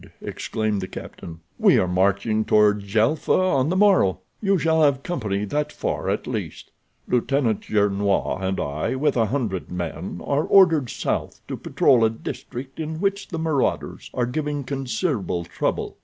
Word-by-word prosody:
exclaimed 110 Hz, -2 st, -2 dB
the 95 Hz, -, -4 dB
captain. 85 Hz, -2 st, -9 dB, 0.2 s
"We -, -, +5 dB
are 90 Hz, -, +2 dB
marching 100 Hz, +4 st, +1 dB
toward 105 Hz, -1 st, +4 dB
Djelfa 110 Hz, +9 st, +1 dB
on 155 Hz, -7 st, +2 dB
the 180 Hz, -, 0 dB
morrow. 190 Hz, -, +4 dB, 0.2 s
You 195 Hz, -2 st, +2 dB
shall 160 Hz, -1 st, +2 dB
have 140 Hz, -3 st, +3 dB
company 105 Hz, -, -2 dB
that 150 Hz, +7 st, -2 dB
far -, -, -3 dB
at -, -, -1 dB
least. -, -, -5 dB, 0.4 s
Lieutenant 125 Hz, -2 st, +1 dB
Gernois 100 Hz, -2 st, +1 dB
and 95 Hz, 0 st, -1 dB
I, 75 Hz, -, -2 dB
with 145 Hz, +2 st, +1 dB
a 115 Hz, -3 st, +2 dB
hundred 110 Hz, -7 st, -2 dB
men, 85 Hz, -1 st, -5 dB
are 145 Hz, +2 st, +1 dB
ordered 165 Hz, -, +5 dB
south -, -, -3 dB
to -, -, -4 dB
patrol 120 Hz, -3 st, +3 dB
a 110 Hz, -, +5 dB
district 125 Hz, +4 st, -7 dB
in 160 Hz, 0 st, -4 dB
which 200 Hz, +1 st, -1 dB
the 165 Hz, -, -5 dB
marauders 160 Hz, -4 st, -1 dB
are 125 Hz, -, +1 dB
giving 145 Hz, +2 st, -2 dB
considerable 130 Hz, -, -2 dB
trouble. -, -, -3 dB
125 Hz, 155 wpm, -23 LUFS, 100-150 Hz, 0.4 s, We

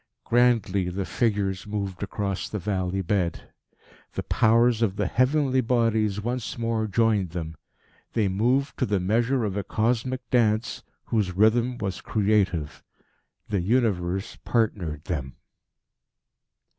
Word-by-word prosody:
Grandly 115 Hz, -6 st, +2 dB
the 95 Hz, +2 st, -3 dB
figures 100 Hz, -5 st, -1 dB
moved 100 Hz, -3 st, -4 dB
across 100 Hz, -1 st, -3 dB
the 105 Hz, -, -3 dB
valley 95 Hz, -1 st, -2 dB
bed. 90 Hz, -2 st, -1 dB, 0.6 s
The -, -, -3 dB
powers 115 Hz, +1 st, +3 dB
of 100 Hz, -4 st, +1 dB
the 105 Hz, -, 0 dB
heavenly 130 Hz, -, +2 dB
bodies 110 Hz, -4 st, +1 dB
once 120 Hz, +3 st, -3 dB
more 115 Hz, -1 st, -1 dB
joined 105 Hz, -3 st, +2 dB
them. 80 Hz, -1 st, -5 dB, 0.6 s
They 110 Hz, -3 st, +2 dB
moved 125 Hz, +9 st, 0 dB
to 130 Hz, -, +1 dB
the 100 Hz, -2 st, +1 dB
measure 115 Hz, +7 st, +1 dB
of 100 Hz, -2 st, -3 dB
a 100 Hz, -, -1 dB
cosmic 120 Hz, +5 st, -1 dB
dance, 110 Hz, -2 st, +1 dB, 0.2 s
whose 105 Hz, -5 st, 0 dB
rhythm 120 Hz, +4 st, +3 dB
was 95 Hz, -4 st, -4 dB
creative. 100 Hz, -8 st, 0 dB, 0.7 s
The 100 Hz, -3 st, 0 dB
Universe 95 Hz, -2 st, 0 dB
partnered 90 Hz, -10 st, -1 dB
them. 70 Hz, -8 st, -4 dB
105 Hz, 125 wpm, -25 LUFS, 95-115 Hz, 0.7 s, powers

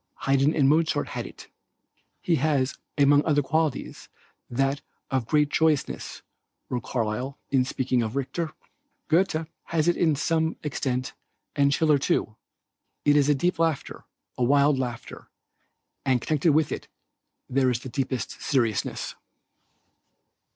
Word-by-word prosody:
Haydn 140 Hz, +2 st, +2 dB
and 140 Hz, -3 st, +4 dB
Mozart 160 Hz, +3 st, +2 dB
had -, -, -4 dB
it. -, -, -12 dB, 0.8 s
"He 170 Hz, -2 st, +2 dB
has 140 Hz, -2 st, 0 dB, 0.2 s
among 145 Hz, 0 st, +5 dB
other 145 Hz, -2 st, +2 dB
qualities 155 Hz, 0 st, -2 dB, 0.4 s
that 135 Hz, +3 st, 0 dB, 0.3 s
of 130 Hz, -4 st, 0 dB
great 150 Hz, -1 st, +3 dB
joyousness," 155 Hz, -2 st, 0 dB, 0.5 s
says 125 Hz, -, 0 dB
Carlyle, 125 Hz, +3 st, -2 dB
in 130 Hz, -2 st, +3 dB
speaking 130 Hz, -2 st, 0 dB
of 110 Hz, +1 st, -3 dB
Richter. 155 Hz, +4 st, -2 dB, 0.6 s
"Goethe 165 Hz, -1 st, +2 dB, 0.2 s
has 165 Hz, -1 st, 0 dB
it 175 Hz, -, +5 dB
to 160 Hz, -4 st, +2 dB
some 160 Hz, +3 st, 0 dB
extent 130 Hz, -3 st, -2 dB, 0.4 s
and 140 Hz, -1 st, +3 dB
Schiller 150 Hz, 0 st, +3 dB
too. 110 Hz, -5 st, 0 dB, 0.7 s
It 145 Hz, -, +5 dB
is 145 Hz, -1 st, +4 dB
a 145 Hz, -, +4 dB
deep 175 Hz, +4 st, 0 dB
laughter, 165 Hz, -4 st, -1 dB, 0.4 s
a -, -, +2 dB
wild 140 Hz, +2 st, +4 dB
laughter, 120 Hz, -2 st, -6 dB, 0.7 s
and 130 Hz, -2 st, +2 dB
connected 155 Hz, +5 st, +1 dB
with 155 Hz, 0 st, +2 dB
it, -, -, -5 dB, 0.6 s
there 130 Hz, 0 st, +2 dB
is 120 Hz, -1 st, -1 dB
the -, -, -8 dB
deepest 130 Hz, 0 st, -3 dB
seriousness." 115 Hz, -6 st, 0 dB
140 Hz, 135 wpm, -26 LUFS, 130-155 Hz, 0.8 s, among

